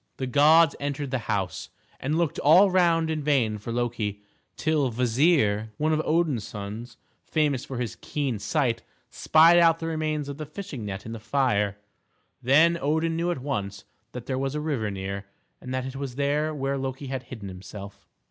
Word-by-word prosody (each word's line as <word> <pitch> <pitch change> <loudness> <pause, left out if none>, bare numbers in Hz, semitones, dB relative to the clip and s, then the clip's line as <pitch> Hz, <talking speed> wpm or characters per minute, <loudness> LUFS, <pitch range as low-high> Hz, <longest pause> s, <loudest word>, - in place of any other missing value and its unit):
The 130 - -2
gods 150 +4 +5
entered 140 -1 -3
the 130 - 0
house, 95 -5 -2 0.3
and 150 +4 -1
looked 170 -3 0
all 180 +7 +6
round 165 -3 +3
in 155 -1 -2
vain 125 -8 +1
for 110 +3 -6
Loki, 115 -4 -2 0.3
till 155 -5 +1
Kvasir, 115 -3 +2
one 155 +1 +1
of 155 - +1
Odin's 155 -8 +1
sons, 110 +4 -7 0.3
famous 150 -5 0
for 130 - -6
his 120 -3 -3
keen 135 -7 -2
sight, 120 +1 0 0.3
spied 165 +2 +5
out 165 -1 +5
the 165 - -6
remains 155 -2 -2
of 140 -1 -6
the 155 - -5
fishing 155 - -7
net 100 -1 -6
in 115 - -6
the 115 - -6
fire; 110 -4 0 0.6
then 160 +7 +4
Odin 160 +3 0
knew 170 +2 0
at 150 -8 -3
once 105 -7 -3 0.3
that 125 -1 -7
there 130 0 -2
was 135 +1 -2
a - - -1
river 140 -9 -1
near, 100 0 -5 0.3
and 130 - -7
that 130 0 -2
it 130 0 -6
was 135 -2 -5
there 145 +2 0
where 140 -2 -2
Loki 135 +1 -4
had 130 -1 -4
hidden 110 -6 -7
himself. 95 +2 -10
135 Hz, 185 wpm, -26 LUFS, 115-155 Hz, 0.6 s, all